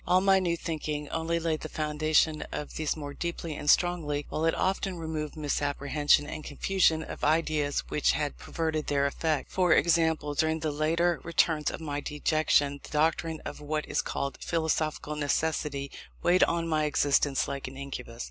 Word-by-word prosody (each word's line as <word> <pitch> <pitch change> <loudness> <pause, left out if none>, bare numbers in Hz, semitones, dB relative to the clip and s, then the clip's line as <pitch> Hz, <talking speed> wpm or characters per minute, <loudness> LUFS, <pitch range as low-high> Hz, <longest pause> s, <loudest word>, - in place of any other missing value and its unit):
All 180 - +5
my 195 0 +4
new 170 -2 0
thinking 150 -3 -3
only 165 +1 -1
laid 160 -2 -1
the 155 - -6
foundation 155 0 +1
of 150 - -5
these 155 0 -1
more 145 -2 -6
deeply 170 -1 -4
and 145 - -3
strongly, 150 -5 +2
while 160 - -1
it 165 - +2
often 190 -1 -1
removed 160 -2 -4
misapprehension 145 0 +1
and 155 +1 -6
confusion 160 +1 +1
of - - -8
ideas 155 -2 +1
which 150 - +2
had 145 -2 -2
perverted 160 -2 -2
their 140 -1 +2
effect. 150 +1 -1
For 180 -3 +3
example, 160 -3 +2
during 160 +2 +1
the 155 -1 -1
later 165 +3 +1
returns 160 -2 +2
of - - -6
my 145 -2 -3
dejection, 145 -1 +1
the - - -12
doctrine 160 +1 0
of - - -6
what 150 +1 -2
is - - 0
called 140 0 -4
Philosophical 155 -2 -1
Necessity 145 -1 -1 0.3
weighed 180 +1 +5
on 170 0 -1
my 155 -1 +1
existence 145 -2 +2
like 140 -1 -4
an 130 +1 -9
incubus. 135 -4 -7
155 Hz, 170 wpm, -28 LUFS, 145-165 Hz, 0.3 s, All